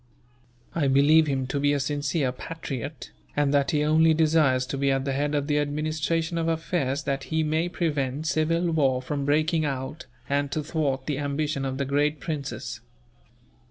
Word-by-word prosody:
I 155 -4 +1
believe 145 +4 +5
him 135 -2 0
to 140 +2 -2
be 145 +1 +2
a 145 - +1
sincere 145 0 0
patriot, 145 0 -6 0.3
and 145 -1 +2
that 140 -1 +3
he 150 -1 +1
only 160 +1 +4
desires 150 -5 +3
to 135 +1 -4
be 140 0 +2
at 135 0 +1
the 135 - -1
head 145 +2 0
of 145 -1 0
the 150 0 +1
administration 155 +3 -1
of 165 - -1
affairs 160 -3 -1
that 140 -1 -2
he 160 0 0
may 160 +3 0
prevent 150 -4 -1
civil 165 +2 +1
war 135 -5 +2
from 140 +1 -3
breaking 155 +3 +2
out, 140 +2 -4 0.2
and 140 0 0
to 155 - -1
thwart 140 -4 -1
the 145 -2 -2
ambition 145 0 -1
of 130 0 -3
the 140 - -1
great 145 +2 +1
princes. 135 -7 -5
145 Hz, 180 wpm, -26 LUFS, 140-155 Hz, 0.3 s, believe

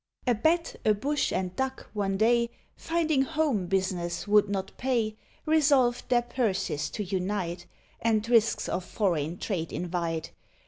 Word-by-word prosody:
A 245 - +4
Bat, 320 +9 +1
a 215 - +4
Bush, 285 +8 0
and 185 -1 -2
Duck, 265 0 -3
one 195 -2 -1
day, 235 +2 +3 0.3
Finding 320 -4 +1
home 275 - 0
business 185 -1 -1
would 205 0 +4
not 195 -2 -3
pay, 235 -4 0 0.3
Resolved 280 -7 +3
their 240 -1 +3
purses 220 - -1
to 210 - -4
unite, 185 -2 -2 0.3
And 225 -1 +1
risks 230 -2 +3
of 185 - -2
foreign 175 -5 -1
trade 175 -6 -3
invite. 170 -2 -3
215 Hz, 140 wpm, -28 LUFS, 185-255 Hz, 0.3 s, A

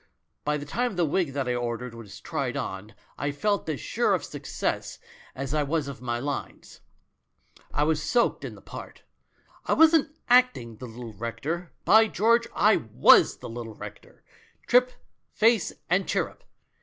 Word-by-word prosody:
By 150 0 0
the 145 - -7
time 240 +8 -1
the 175 -1 +2
wig 160 -2 0
that 135 -2 -2
I 125 - +1
ordered 120 0 -3
was 115 -4 -11
tried 135 0 -3
on 105 -5 -5 0.2
I 145 - -1
felt 200 +5 -1
as 150 -5 -2
sure - - +1
of - - -4
success - - -4 0.4
as 135 +1 -4
I 155 - +2
was 145 0 -1
of 140 -2 -8
my 120 -2 -2
lines! 140 +3 -6 0.9
I 145 - +1
yvsis 155 0 +2
soaked 195 +11 +1
in - - -6
the - - -16
part. - - -10 0.6
I - - +3
wasn't 320 -2 +4
acting 245 - +3
the 125 - -8
little 115 0 -9
rector 150 - -4
— - - -44
by 220 +1 +6
George, 230 +3 +2
I 210 +1 +5
was 110 - +5
the - - -9
little 115 -1 -7
rector, - - -11 0.4
trip, 250 +1 +4 0.4
face 225 -1 +3 0.2
and 180 +3 +1
chirrup. - - -2
145 Hz, 170 wpm, -26 LUFS, -, 0.9 s, by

